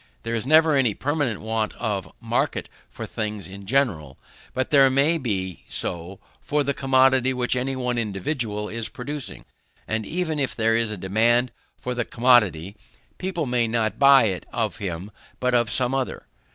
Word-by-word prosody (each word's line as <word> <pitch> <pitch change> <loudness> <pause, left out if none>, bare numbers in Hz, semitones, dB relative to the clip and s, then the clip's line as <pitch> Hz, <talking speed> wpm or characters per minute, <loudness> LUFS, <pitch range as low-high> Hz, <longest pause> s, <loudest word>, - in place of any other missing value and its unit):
There 115 - -3
is 115 +2 -2
never 160 +1 +6
any 125 -7 +2
permanent 145 -6 -1
want 110 0 -1
of 105 -5 -3
market - - -1 0.2
for - - -7
things 105 -4 -4
in 100 0 -11
general; 95 - 0 0.3
but 130 0 -2
there 135 -2 +6
may 140 +5 +2
be 95 - -3
so 90 +3 -2 0.2
for 150 0 0
the 140 0 0
commodity 130 -1 +3
which 125 0 0
any 130 +2 -1
one 125 -2 -1
individual 105 0 -2
is 115 0 -5
producing; 145 +2 -6 0.4
and 110 0 -1
even 160 - -2
if 135 - -1
there 115 0 +2
is 115 -1 +1
a 105 - -4
demand 115 +7 +2 0.3
for 125 - -4
the 120 0 -1
commodity, 105 -8 +2 0.4
people 180 -4 -2
may 120 -2 +1
not 110 -3 -1
buy 140 -2 +7
it 95 -5 -2
of 110 -3 -2
him 95 +1 -5 0.3
but 125 0 0
of 120 -2 +3
some 125 +3 +1
other. 135 -1 -3
120 Hz, 170 wpm, -24 LUFS, 105-135 Hz, 0.4 s, buy